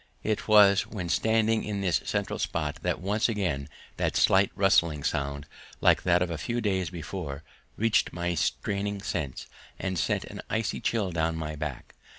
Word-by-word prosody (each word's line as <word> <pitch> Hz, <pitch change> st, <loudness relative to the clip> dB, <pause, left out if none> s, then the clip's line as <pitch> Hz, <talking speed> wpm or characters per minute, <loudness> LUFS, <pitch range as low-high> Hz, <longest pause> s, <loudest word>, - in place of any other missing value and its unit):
It 110 Hz, -1 st, -1 dB
was 105 Hz, -2 st, +6 dB
when 90 Hz, -6 st, -5 dB
standing 110 Hz, +5 st, +2 dB
in 105 Hz, -2 st, -3 dB
this 90 Hz, -3 st, +1 dB
central -, -, -2 dB
spot -, -, -2 dB
that -, -, -1 dB
once 105 Hz, +5 st, +1 dB
again 90 Hz, -11 st, -2 dB, 0.3 s
that -, -, 0 dB
slight 95 Hz, +1 st, +4 dB
rustling 85 Hz, -6 st, +3 dB
sound, 70 Hz, +1 st, -2 dB, 0.3 s
like -, -, +4 dB
that 90 Hz, 0 st, +3 dB
of 90 Hz, -, -3 dB
a 80 Hz, -, -4 dB
few 120 Hz, +9 st, -2 dB
days 95 Hz, -6 st, 0 dB
before, 80 Hz, -3 st, -6 dB, 0.3 s
reached 115 Hz, 0 st, +2 dB
my 90 Hz, 0 st, -2 dB
straining 100 Hz, +4 st, -1 dB
sense 75 Hz, -10 st, -3 dB, 0.3 s
and 95 Hz, -2 st, -2 dB
sent -, -, 0 dB
an -, -, -8 dB
icy 110 Hz, -1 st, -1 dB
chill 105 Hz, -5 st, 0 dB
down 80 Hz, -1 st, 0 dB
my 75 Hz, -1 st, -4 dB
back. 75 Hz, -4 st, -6 dB
95 Hz, 165 wpm, -28 LUFS, 80-105 Hz, 0.3 s, was